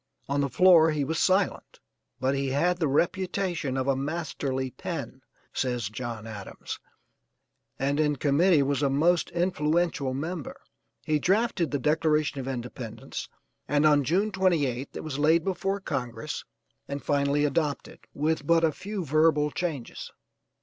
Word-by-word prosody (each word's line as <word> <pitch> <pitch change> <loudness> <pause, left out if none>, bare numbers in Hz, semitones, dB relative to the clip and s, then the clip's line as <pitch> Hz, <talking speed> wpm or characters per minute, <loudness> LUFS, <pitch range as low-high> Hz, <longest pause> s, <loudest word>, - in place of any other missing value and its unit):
On 140 +1 0
the 140 - 0
floor 165 +4 +6
he 150 -2 0
was 160 +4 -2
silent 190 0 +1 0.4
but 130 +1 +1
he 140 0 -1
had 175 +7 +1
the 160 - +2
'reputation 175 -1 0
of 130 0 -1
a 135 - +3
masterly 135 -3 -3
pen,' - - -6 0.3
says 125 -5 -1
John 115 -1 -6
Adams, 105 -3 -7 1.0
and 140 +2 0
in 150 -1 +2
committee 150 +3 +3
was 140 0 0
a 140 - +2
most 165 +5 +2
influential 170 -5 0
member. 160 +1 -5 0.5
He 155 -1 +1
drafted 195 -1 +1
the 145 - 0
Declaration 150 +1 +1
of 130 - -5
Independence, 120 -3 -6 0.4
and 145 +1 +2
on 145 -2 +5
June 190 - +1
28th 150 -9 0
it - - -5
was 145 -3 -4
laid 160 +2 +3
before 195 +1 -1
Congress 125 - -4 0.4
and 140 0 -5
finally 145 +1 +2
adopted, 145 0 -2 0.2
with 150 0 -1
but 170 0 +4
a 160 - +4
few 195 +3 -5
verbal 150 0 +3
changes. 155 -9 -4
150 Hz, 145 wpm, -27 LUFS, 135-170 Hz, 1.0 s, floor